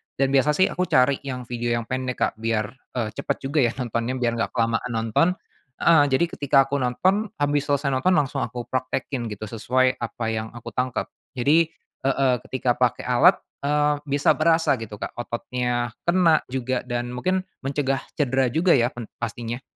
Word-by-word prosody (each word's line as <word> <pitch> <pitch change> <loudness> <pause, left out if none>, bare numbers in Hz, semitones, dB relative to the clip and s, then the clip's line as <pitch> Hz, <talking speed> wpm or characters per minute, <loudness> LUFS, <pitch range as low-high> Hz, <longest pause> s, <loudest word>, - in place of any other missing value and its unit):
dan 135 0 +1
biasa 140 +2 +3
sih 185 - +3
aku 180 0 -1
cari 140 -4 +3
yang 125 -1 -4
video 120 -1 -2
yang 120 - -2
pendek, 130 +1 -3
Kak, - - +1
biar, 110 -1 -1 0.2
eee, 115 -4 -1
cepet - - -3
juga 155 - +2
ya 115 - -4
nontonnya, 120 0 -2
biar 120 -2 0 0.2
gak - - -30
kelamaan 115 +1 0
nonton. 115 +8 +2 0.5
Heeh, 145 -4 +5
jadi 135 +6 +3
ketika 140 -4 +2
aku 140 - -2
nonton, 185 - +1
abis 145 0 +1
selesai 140 0 +1
nonton 135 +6 +2
langsung 145 -5 +1
aku 120 -1 -5
praktekin 130 -2 -3
gitu 105 +1 -6
sesuai 130 +4 +1
apa 115 0 -5
yang 110 0 -3
aku 120 0 -10
tangkep. 125 0 -1 0.3
Jadi 155 +6 +3 0.3
heeh, 135 -1 +2
ketika 125 -2 -1
pakai 125 -1 0
alat, 145 +10 +5 0.2
eee, 150 +1 +2
bisa 140 -1 +2
berasa 165 -2 +3
gitu 110 -4 -8
Kak, - - -6
ototnya 120 0 -2
kena 175 -3 +4
juga 130 -1 -1
dan 120 -1 -3
mungkin 185 +8 -1 0.2
mencegah 135 0 -1 0.2
cedera 130 -3 +2
juga 170 +6 +4
ya 120 -1 +2
pen 120 -3 -8 0.2
pastinya. 115 +1 -4
130 Hz, 175 wpm, -24 LUFS, 120-145 Hz, 0.5 s, Heeh